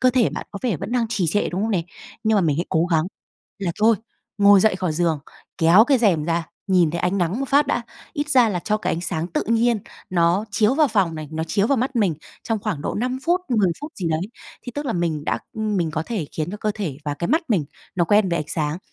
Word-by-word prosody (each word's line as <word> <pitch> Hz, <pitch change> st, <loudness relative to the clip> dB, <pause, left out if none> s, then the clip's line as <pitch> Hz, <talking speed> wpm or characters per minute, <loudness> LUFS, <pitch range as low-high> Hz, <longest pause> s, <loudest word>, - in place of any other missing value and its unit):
cơ 255 Hz, -, +5 dB
thể 245 Hz, -2 st, +2 dB
bạn -, -, -6 dB
có 200 Hz, -, -6 dB
vẻ 235 Hz, -8 st, 0 dB
vẫn 200 Hz, -, -6 dB
đang 240 Hz, -2 st, +1 dB
trì 200 Hz, -6 st, 0 dB
trệ, 205 Hz, +6 st, +1 dB
đúng 185 Hz, +4 st, -2 dB
không 225 Hz, -, 0 dB
nè? 185 Hz, -6 st, +1 dB, 0.4 s
Nhưng 220 Hz, -, +3 dB
mà -, -, +4 dB
mình 155 Hz, -5 st, +1 dB
hãy 170 Hz, -, -1 dB
cố 160 Hz, +1 st, +2 dB
gắng 160 Hz, -3 st, +2 dB, 0.5 s
là 195 Hz, -4 st, -1 dB
thôi, 225 Hz, +1 st, +5 dB, 0.4 s
ngồi 200 Hz, -1 st, +7 dB
dậy 215 Hz, -2 st, +3 dB
khỏi 185 Hz, -4 st, -1 dB
giường, 160 Hz, -1 st, +1 dB, 0.4 s
kéo 170 Hz, +7 st, +6 dB
cái 270 Hz, +1 st, +3 dB
rèm 180 Hz, -10 st, +2 dB
ra, 170 Hz, 0 st, 0 dB, 0.2 s
nhìn 180 Hz, -5 st, +3 dB
thấy 170 Hz, -, -3 dB
ánh 185 Hz, +2 st, 0 dB
nắng 180 Hz, +7 st, 0 dB
một 275 Hz, -, -2 dB
phát 290 Hz, +1 st, +4 dB
đã, 260 Hz, -, 0 dB, 0.3 s
ít 295 Hz, -1 st, -3 dB
ra 255 Hz, -5 st, +5 dB
là 190 Hz, -4 st, -1 dB
cho 210 Hz, +5 st, 0 dB
cái 215 Hz, -, -2 dB
ánh 165 Hz, -, -2 dB
sáng 165 Hz, -1 st, -2 dB
tự 175 Hz, -, -2 dB
nhiên 230 Hz, +1 st, +2 dB, 0.3 s
nó 175 Hz, +3 st, +2 dB
chiếu 215 Hz, +5 st, +2 dB
vào 305 Hz, -1 st, +4 dB
phòng 195 Hz, -8 st, +1 dB
này, 155 Hz, -1 st, -6 dB
nó 160 Hz, 0 st, -2 dB
chiếu 195 Hz, +5 st, +1 dB
vào 275 Hz, -, +2 dB
mắt 255 Hz, +2 st, -1 dB
mình 200 Hz, -8 st, +2 dB, 0.3 s
trong 225 Hz, -1 st, -1 dB
khoảng 205 Hz, -7 st, -3 dB
độ -, -, -2 dB
5 250 Hz, +3 st, -1 dB
phút, 350 Hz, +2 st, +2 dB
10 215 Hz, -7 st, +3 dB
phút 300 Hz, +2 st, -7 dB
gì 180 Hz, -, -3 dB
đấy, 160 Hz, 0 st, 0 dB, 0.4 s
thì 245 Hz, -, -7 dB
tức 290 Hz, 0 st, -3 dB
là 240 Hz, -, 0 dB
mình 165 Hz, -4 st, -1 dB
đã -, -, 0 dB, 0.2 s
mình 210 Hz, -7 st, -1 dB
có 155 Hz, +1 st, -2 dB
thể 205 Hz, -10 st, -3 dB
khiến 155 Hz, +1 st, -3 dB
cho 210 Hz, -, -5 dB
cơ 215 Hz, -, -1 dB
thể 180 Hz, -11 st, -4 dB
và 145 Hz, -1 st, -2 dB
cái 170 Hz, +4 st, -3 dB
mắt 320 Hz, +3 st, +2 dB
mình, 195 Hz, -10 st, +2 dB, 0.3 s
nó 175 Hz, -, +2 dB
quen 205 Hz, +2 st, +3 dB
với 170 Hz, -, 0 dB
ánh 150 Hz, -, -4 dB
sáng. 155 Hz, 0 st, -1 dB
195 Hz, 265 wpm, -22 LUFS, 170-230 Hz, 0.5 s, ngồi